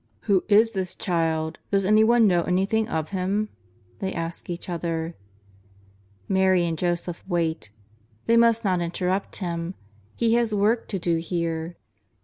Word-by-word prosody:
" - - -39
Who 195 -4 +2
is 220 +2 +5
this 190 -4 -3
Child? 165 -2 -1
Does 195 -1 +1
anyone 220 +3 +5
know 175 -4 +4
anything 195 +6 0
of 160 +1 -2
Him 200 +3 -1 0.2
?" 95 0 -33
they 190 -1 -2
ask 165 0 -5
each 175 0 -5
other. 165 -1 -3 1.1
Mary 190 -2 +3
and 165 -1 -1
Joseph 175 +1 -2
wait. 165 - -1 0.6
They 230 - +3
must 230 -1 +4
not 185 -3 +2
interrupt 180 +3 -2
Him. 170 -1 -4 0.4
He 230 -1 +2
has 235 -2 +2
a - - +1
work 220 +4 +2
to 195 - -3
do 170 -2 0
here. 165 0 -3
180 Hz, 155 wpm, -25 LUFS, 170-205 Hz, 1.1 s, is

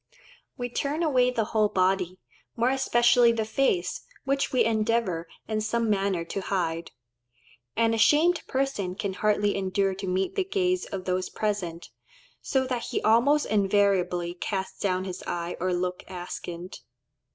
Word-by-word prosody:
We 245 -2 -2
turn 285 +6 -2
away 255 -5 +3
the 235 -3 0
whole 215 -2 +3
body, 185 -1 +1 0.4
more 240 +2 +2
especially 240 -2 +4
the 225 -1 -1
face, 215 -6 0 0.2
which 275 0 0
we 255 - +3
endeavour 220 -6 0 0.2
in 215 -1 -1
some 230 +1 0
manner 195 -4 0
to 195 - -4
hide. 170 -4 -2 0.9
An 225 0 +3
ashamed 305 +10 +4
person 260 -9 -1
can 195 -1 -3
hardly 205 0 +1
endure 195 0 0
to 195 +1 -6
meet 185 +1 0
the 390 - +1
gaze 365 -1 0
of 190 -2 -6
those 185 0 -1
present, 185 -6 -3 0.5
so 265 -1 0
that 250 -2 -2
he - - -2
almost 245 +7 +4
invariably 195 -4 +2
casts 190 +1 -4
down 185 -2 0
his 185 -1 -6
eyes 175 0 -3
or 185 +1 0
looks 180 0 -2
askant. 175 -1 -7
205 Hz, 150 wpm, -27 LUFS, 185-240 Hz, 0.9 s, especially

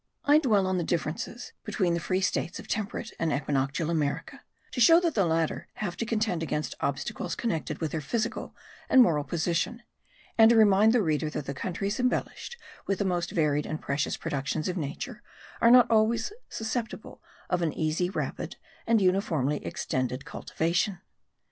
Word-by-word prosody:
I 295 +1 +6
dwell 215 -10 +3
on 185 -1 0
the - - -1
differences 170 +8 -3
between 190 -5 0
the 170 - 0
free 185 +3 -1
states 185 -1 -1
of - - -10
temperate 220 +2 -3
and 165 -1 +1
equinoctial 140 +3 0
America, 150 -4 -2 0.3
to 250 - -2
show 330 +8 +8
that 340 -3 0
the 195 -5 +2
latter 160 -1 0
have 195 -5 -3
to 230 - -3
contend 215 -7 0
against 150 -4 -2
obstacles 140 +10 -2
connected 160 -9 -2
with 160 -3 -2
their 160 - -2
physical 220 +9 -3 0.3
and 260 - +6
moral 150 -9 +2
position; 175 +9 -1 0.6
and 225 0 +9
to 235 - +5
remind 215 0 +6
the 235 -2 +3
reader 155 -2 0
that 150 -2 -5
the 140 - -4
countries 195 - -3
embellished 250 - -2 0.3
with 195 - +1
the 200 - -1
most 175 -2 0
varied 150 -2 +1
and 155 - -3
precious 140 +1 -1
productions 140 +2 -2
of 180 - -2
nature, 190 - -5 0.4
are 230 - +6
not 245 0 +8
always 225 - +2 0.2
susceptible 225 +1 -4 0.3
of 180 -1 0
an 165 -2 +1
easy, 160 +4 0
rapid, 195 - -4 0.3
and 225 -3 +4
uniformly 165 -7 +1
extended 130 -7 -2
cultivation. 175 +4 -1
180 Hz, 170 wpm, -28 LUFS, 155-220 Hz, 0.6 s, and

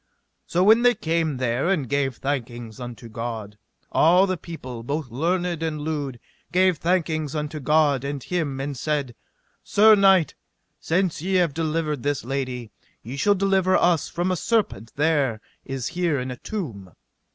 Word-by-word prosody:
So 175 +2 +2
when 220 +4 +6
they 245 0 +5
came 160 -3 -1
there 125 +5 0
and 160 -9 +1
gave 135 -1 0
thankings 120 -5 -4 0.2
to 120 - -11
God 110 -2 -6 0.3
all 180 +4 +5
the 185 -1 -1
people, 130 -9 -8
both 140 +1 -4
learned 170 +5 -1
and 160 -2 -2
lewd, 145 -5 -3 0.3
gave 185 -3 +3
thankings 160 -4 0
unto 150 +1 -3
God 145 -2 +2
and 140 -2 -4
him, 155 -7 -2
and 140 +1 -3
said: 140 -2 -2 0.5
Sir 215 +2 +6
knight, 195 -5 +5 0.5
since 175 -1 0
ye 190 +3 -1
have 175 -5 +3
delivered 155 -2 -1
this 145 -2 -1
lady, 130 -4 -3 0.3
ye 120 +5 -6
shall 205 +9 +3
deliver 190 -1 +2
us 175 -3 +2
from 175 +2 -1
a - - +1
serpent 180 - -1
there 145 -7 +1 0.3
is 135 -3 -3
here 170 -4 0
in 125 0 -4
a 125 - -6
tomb. 115 - -6
150 Hz, 160 wpm, -24 LUFS, 130-175 Hz, 0.5 s, when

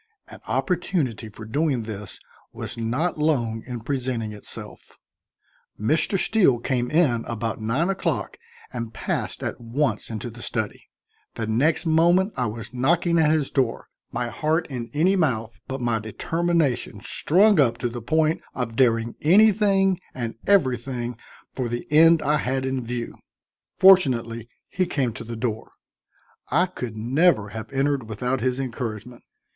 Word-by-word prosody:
An - - -11
opportunity 155 - -1
for 110 +1 -10
doing 140 +1 0
this 105 -3 -7 0.3
was - - -5
not 125 +9 -1
long 120 -8 +1
in 120 -2 -5
presenting 120 -4 -2
itself. 105 - -10 0.8
Mr. 155 - +1
Steele 185 - +3
came 125 0 -1
in 145 -8 +2
about 115 -1 -3
nine 125 +10 0
o'clock 165 - -2 0.4
and 115 -2 -5
passed - - -3
at - - -4
once 120 -1 -1
into 115 +1 -5
the 120 +2 -12
study. 110 -4 -3 0.5
The 115 - -3
next 130 +11 +1
moment 175 +5 +3
I 125 -3 0
was 115 +3 -6
knocking 170 +6 +2
at 155 -2 +4
his 155 -3 +1
door, 130 -4 -1 0.2
my 120 - -2
heart 160 +6 0
in 120 -2 -5
any 170 +6 +3
mouth, 115 - -1
but 135 0 -4
my 120 -2 +1
determination 150 +1 -1
strung 190 - +3
up 120 -5 +3
to 120 - -1
the 120 0 -6
point 155 +6 +1
of 120 -3 -3
daring 115 -2 +2
anything 195 +1 +4 0.2
and 120 -3 -3
everything 125 -9 +1 0.4
for 125 -3 -2
the 120 +1 -4
end 165 +1 +6
I 150 +1 +2
had 130 -1 -1
in 130 -1 -2
view. 120 0 -4 0.6
Fortunately 120 - +4 0.2
he 185 -2 -1
came 135 -9 -1
to 115 - -7
the 115 +1 -6
door; 110 -1 -4 0.8
I 170 +7 +3
could 125 - -6
never 120 - +2
have 110 +1 -7
entered 135 -3 0
without 125 +4 -2
his 130 +1 0
encouragement. 120 -2 -5
125 Hz, 150 wpm, -24 LUFS, 115-160 Hz, 0.8 s, end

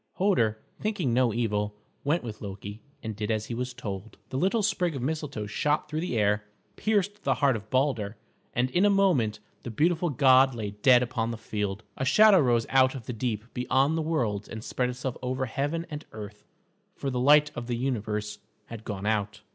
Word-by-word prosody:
Hoder, 120 - +2 0.2
thinking 195 - -1
no 125 -1 +3
evil, 105 -2 -1 0.3
went 155 +5 +1
with 110 -3 -7
Loki 100 +1 -7 0.2
and 110 -2 -4
did 105 +1 -3
as 110 -1 0
he 120 - -5
was 125 +2 -3
told. 110 -4 -7
The 130 - -3
little 195 +6 +2
sprig 180 -6 +1
of 135 - -4
Mistletoe 145 -6 -3
shot 150 +9 0
through 155 0 -3
the 160 -8 -2
air, 105 0 +2 0.3
pierced 205 -1 0
the - - +1
heart 140 -4 +3
of 110 -1 -7
Balder, 125 -5 0 0.4
and 125 +1 +1
in 180 - +3
a 205 - +6
moment 165 - +2 0.2
the - - -6
beautiful 165 +8 +1
god 130 -2 +5
lay 105 -3 -4
dead 125 +4 +5
upon 120 -2 -2
the 115 - -4
field. 105 -1 -3
A - - -2
shadow 210 +8 +6
rose 120 -5 +3
out 130 0 +4
of 125 -4 -7
the 125 - -4
deep 115 -2 -2
beyond 135 +4 +2
the 165 - 0
worlds 120 -11 -1
and 110 -1 -7
spread 125 +1 -1
itself 125 0 -4
over 130 +1 -1
heaven 145 +7 -2
and 150 +1 -5
earth, 105 -1 -9 0.5
for 135 - -3
the 125 - -1
light 145 +3 +5
of 120 0 -6
the 120 -1 -1
universe 105 -4 -2 0.3
had 115 -2 -7
gone 100 -2 -5
out. 105 0 -1
125 Hz, 200 wpm, -27 LUFS, 110-150 Hz, 0.5 s, a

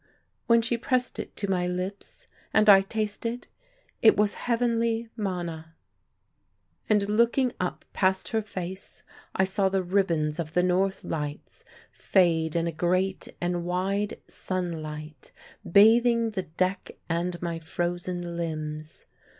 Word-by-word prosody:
when 230 -1 +5
she 235 0 0
pressed 250 +1 0
it - - -6
to 200 - -2
my 180 -2 0
lips, 185 +3 -5 0.3
and 215 0 +5
I 195 -1 +8
tasted, 220 +3 -3 0.6
it 220 - +6
was 205 0 +3
heavenly 230 -1 0
manna. 170 -6 -4 1.1
And 210 -2 +3
looking 235 +4 +2
up 180 - -3
past 190 0 +1
her 225 -1 0
face 190 -2 -7 0.3
I 190 - +3
saw 190 +1 +1
the 190 -1 0
ribbons 170 -5 +1
of 160 -1 -4
the 180 - +3
North 190 +2 +1
Lights 150 -2 -5 0.3
fade 165 -4 +2
in 165 0 +1
a 170 - -1
great 185 +4 0
and 175 0 -1
wide 195 +4 -1
sunlight, 155 -5 -5 0.4
bathing 230 +3 +5
the 190 -4 -4
deck 185 +1 -1
and 175 +1 -1
my 170 -2 -3
frozen 175 +1 -3
limbs. 155 -2 -5
185 Hz, 130 wpm, -27 LUFS, 170-210 Hz, 1.1 s, I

